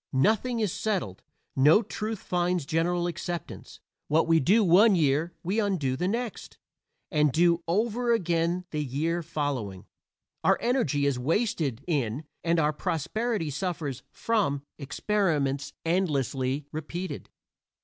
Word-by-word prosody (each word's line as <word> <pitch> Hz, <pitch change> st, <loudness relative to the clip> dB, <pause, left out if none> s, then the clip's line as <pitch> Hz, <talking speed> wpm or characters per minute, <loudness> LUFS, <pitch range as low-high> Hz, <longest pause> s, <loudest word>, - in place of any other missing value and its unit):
Nothing 225 Hz, -, +2 dB
is 210 Hz, -6 st, 0 dB
settled; 190 Hz, -, -2 dB, 0.3 s
no 150 Hz, -, +6 dB
truth 215 Hz, 0 st, -5 dB
finds 175 Hz, -3 st, 0 dB
general 170 Hz, +3 st, 0 dB
acceptance. 175 Hz, -1 st, -5 dB, 0.3 s
What 155 Hz, +2 st, +3 dB
we 165 Hz, -1 st, +5 dB
do 205 Hz, -, +4 dB
one 195 Hz, +4 st, +6 dB
year 155 Hz, +1 st, +1 dB
we 190 Hz, +6 st, 0 dB
undo 180 Hz, -11 st, 0 dB
the 180 Hz, +7 st, -1 dB
next, 230 Hz, +3 st, -4 dB, 0.5 s
and 150 Hz, -3 st, +3 dB
do 170 Hz, +3 st, +3 dB
over 230 Hz, +6 st, +1 dB
again 175 Hz, -3 st, +1 dB
the 150 Hz, -1 st, -1 dB
year 155 Hz, +6 st, -1 dB
following. 140 Hz, -, -3 dB, 0.6 s
Our -, -, +4 dB
energy 165 Hz, -, +1 dB
is 140 Hz, -3 st, +1 dB
wasted 150 Hz, -, 0 dB
in, 140 Hz, -5 st, -1 dB, 0.2 s
and 170 Hz, 0 st, +2 dB
our 150 Hz, -1 st, +2 dB
prosperity 175 Hz, -, -2 dB
suffers 145 Hz, -4 st, -3 dB
from, 195 Hz, -12 st, 0 dB, 0.2 s
experiments 145 Hz, -4 st, 0 dB
endlessly 140 Hz, -5 st, 0 dB
repeated. 170 Hz, +4 st, -5 dB
165 Hz, 125 wpm, -27 LUFS, 145-195 Hz, 0.6 s, no